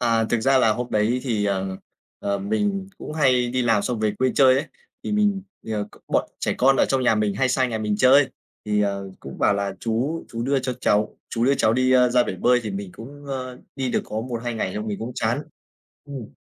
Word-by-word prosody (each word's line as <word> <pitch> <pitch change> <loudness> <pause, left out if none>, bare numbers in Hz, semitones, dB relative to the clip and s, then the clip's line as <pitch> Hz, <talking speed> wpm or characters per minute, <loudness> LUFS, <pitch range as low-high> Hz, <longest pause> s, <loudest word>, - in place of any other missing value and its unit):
À, 115 -1 +2
thực 115 +1 0
ra 135 +3 +4
là 115 -4 +4
hôm 125 +3 -4
đấy 110 +4 +1
thì, 110 -6 -1
ờ, 95 -1 -1 0.4
ờ, 100 0 -1
mình 190 - -1
cũng - - -7
hay 130 -5 +3
đi 130 +1 0
làm 115 -4 +2
xong 120 0 -2
về 110 -1 +2
quê 130 0 +2
chơi 130 -2 +6
ấy. 140 +4 0 0.4
Thì - - -2
mình, 205 -2 +2 0.2
ờ, 105 -2 -2
c - - -21
bọn - - +1
trẻ - - -1
con 135 +2 +5
ở - - +4
trong 135 -1 +1
nhà 125 - +4
mình 105 -2 0
hay 130 +6 +1
sang 130 0 +1
nhà 110 - -2
mình 105 -1 -1
chơi 135 +4 +5 0.4
thì, 105 -1 +1
ờ, 100 -1 -2
cũng 70 - -9
bảo 100 - +3
là 100 -1 -2
"Chú 125 +9 -1
chú 115 0 -4
đưa 135 +3 +1
cho 130 0 -2
cháu 105 -3 +1
chú 115 0 0
đưa 135 +2 +4
cháu 110 - +2
đi, 130 +2 +2
a, 125 -1 +5
ra 125 0 +4
bể 95 - -3
bơi." 125 +6 +3
Thì 110 - -4
mình 100 -1 -5
cũng, 140 +8 -11
ơ, 130 -2 -5 0.2
đi 130 -2 -1
được - - 0
có 110 - -4
1-2 120 0 -4
ngày 95 -4 -2
xong 105 +1 -4
mình 105 -2 -3
cũng 115 +3 -5
chán. 120 +6 0 0.6
Ừm. 135 -7 -7
120 Hz, 245 wpm, -23 LUFS, 105-130 Hz, 0.6 s, chơi